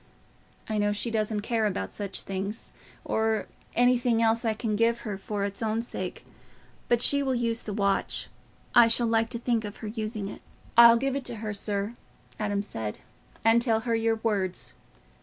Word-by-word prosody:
I 215 -1 -1
know 205 0 +2
she 230 +3 -1
doesn't 215 -1 0
care 220 0 +1
about 95 - -3
such 200 -2 -4
things—or 210 +2 -3 0.3
anything 245 -1 +3
else 230 +1 +3
I 220 -2 +1
can 220 -1 -1
give 230 +2 +2
her 210 -3 -4
for 200 +1 -4
its 200 +1 -3
own 225 +1 0
sake. - - -5 0.6
But 240 0 +3
she 280 0 +5
will 265 -2 0
use 230 -1 0
the 210 - -5
watch—I 200 +3 +1
shall 230 +1 +3
like 225 0 +2
to 240 - -4
think 235 -1 0
of 205 -1 -7
her 215 - -7
using 215 -2 -4
it." - - -8 0.3
"I'll 235 0 +9
give 270 +2 -1
it 275 - -3
to 240 - -3
her, 215 -1 -4
sir," 205 +1 -2 0.5
Adam 205 -1 -1
said, 110 - -4 0.5
"and 225 +1 +6
tell 225 -2 +2
her 230 0 -1
your 225 0 +2
words. 205 -5 -2
225 Hz, 175 wpm, -27 LUFS, 205-235 Hz, 0.6 s, I'll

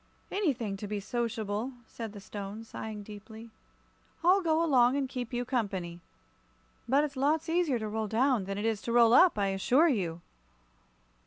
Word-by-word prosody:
"Anything 255 - -1
to 205 - -6
be 210 0 -3
sociable," 220 +2 -3
said 225 -2 -7
the 205 - -9
Stone, 200 +2 -7
sighing 220 -2 -7
deeply. 220 +2 -11 0.7
"I'll 370 +3 +5
go 330 -1 +2
along 255 -3 +4
and 275 -2 0
keep 250 -3 -5
you 245 0 -2
company. 195 -9 -2 0.9
But 275 +3 +4
it's 290 -1 -3
lots 300 +5 +1
easier 325 -5 +1
to 220 -1 -4
roll 220 0 -2
down 235 -1 +2
than 195 +1 -4
it 205 - -2
is 220 -2 0
to 235 - -4
roll 235 -1 +5
up, 360 -2 +6
I 200 -1 +1
assure 250 - +3
you!" 175 - -1
230 Hz, 170 wpm, -30 LUFS, 205-270 Hz, 0.9 s, up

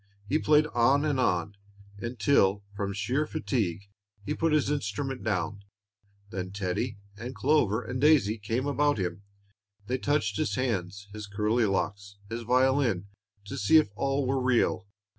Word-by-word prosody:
He 150 +9 +1
played 150 0 +4
on 130 +5 +3
and 145 -3 0
on, 90 -4 0 0.4
until, 105 -3 +2
from 100 -1 -2
sheer 125 +10 -1
fatigue, 110 - -2 0.4
he 150 - -1
put 165 +1 0
his 150 -2 +2
instrument 135 0 -3
down. 100 -1 -2 0.7
Then 95 -3 -4
Teddie 100 +3 -2 0.2
and 120 +4 -7
Clover 115 -2 +2
and 125 +3 -4
Daisy 140 -8 +4
came 115 +5 -2
about 145 -1 +2
him; 95 0 -3 0.6
they 130 +4 -2
touched 140 -8 0
his 100 - 0
hands, 100 -6 -2
his 105 -1 -7
curly 105 +4 +1
locks, 100 0 -2
his 115 +1 -3
violin, 125 -5 +2 0.4
to 100 - -5
see 105 +11 +5
if 155 -10 +3
all 135 +3 0
were 135 +1 0
real. 125 -6 +1
115 Hz, 150 wpm, -28 LUFS, 100-135 Hz, 0.7 s, see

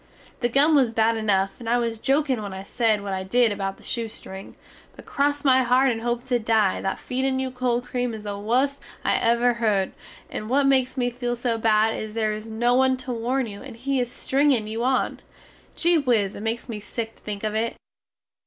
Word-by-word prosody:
The 240 - +1
gum 285 +6 +4
was 270 -5 +4
bad 225 0 +2
enuf 195 -3 0
and 230 -2 -5
I 240 - +3
was 230 -2 -2
jokin 270 -2 +1
when 200 -2 -6
I 190 0 -6
sed 220 -1 +1
what 200 -1 -3
I 190 0 -2
did 235 +4 +3
about 195 -1 -3
the - - -19
shoestring, 215 -4 -6 0.4
but - - -13
cross 285 +1 0
my 260 -1 +5
heart 255 +2 +3
and 225 -1 -3
hope 240 +1 -2
to 250 -2 +1
dye, 220 -4 +2
that 195 - -2
feedin 260 +1 -1
you 260 -1 -2
cold 250 -1 -1
cream 245 -2 -2
is 215 - -9
the 205 -1 -4
wust 250 +7 0 0.2
I - - +3
ever 235 +1 +3
herd, 210 -5 +1 0.4
and 215 - -6
what 275 +2 +3
makes 265 -1 +2
me 245 -1 +1
feel 245 0 -2
so 235 -1 -1
bad 220 0 +3
is 215 0 -6
there 215 -1 +1
is 215 +1 -7
no 235 +2 +1
one 260 +1 +3
to 255 0 -6
warn 245 +3 -1
you 205 -2 -8
and 260 -4 -9
he 270 +2 -1
is 245 -1 -1
stringin 270 -5 +1
you 220 +2 -3
on. 260 +1 +1 0.6
Gee 340 -1 +3
whiz, 230 -8 +1
it - - -7
makes 225 +3 -3
me 225 -4 -5
sick 225 +2 -6
to - - -24
think 205 -1 -6
of 215 -1 -1
it! 225 +2 -1
235 Hz, 220 wpm, -24 LUFS, 215-255 Hz, 0.6 s, my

